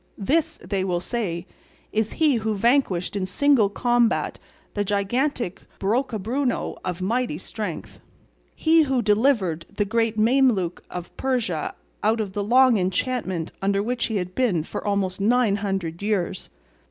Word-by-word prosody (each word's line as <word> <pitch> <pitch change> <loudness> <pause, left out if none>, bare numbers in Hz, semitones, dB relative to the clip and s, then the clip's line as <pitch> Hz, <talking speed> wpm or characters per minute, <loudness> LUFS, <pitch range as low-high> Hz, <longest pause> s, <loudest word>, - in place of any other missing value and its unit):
'This,' 310 +10 +1
they 195 -2 0
will 180 -2 0
say, 180 -5 -3 0.5
'is 220 0 0
he 305 -6 +3
who 220 -1 -1
vanquished 210 -5 +1
in 190 -2 -1
single 240 +1 +3
combat 240 +2 +1 0.3
the 205 - 0
gigantic 205 +2 -1 0.2
Brocabruno 240 +3 -1
of 180 0 -3
mighty 235 -3 0
strength; 190 -1 -6 0.6
he 325 0 +4
who 265 -5 +1
delivered 210 - +2
the 205 - -1
great 225 +1 0
Mameluke 220 -6 +2
of 180 -1 -7
Persia 235 -12 -1 0.3
out 220 +2 +2
of 205 -3 -3
the 205 - -1
long 250 +1 +5
enchantment 185 -2 -1
under 200 +1 +1
which 240 +2 -1
he 220 - -3
had 180 -2 -2
been 205 -11 +1
for - - -6
almost 200 -2 -1
nine 225 -1 +3
hundred 195 -5 -3
years. 205 -4 -1
210 Hz, 140 wpm, -24 LUFS, 190-245 Hz, 0.6 s, long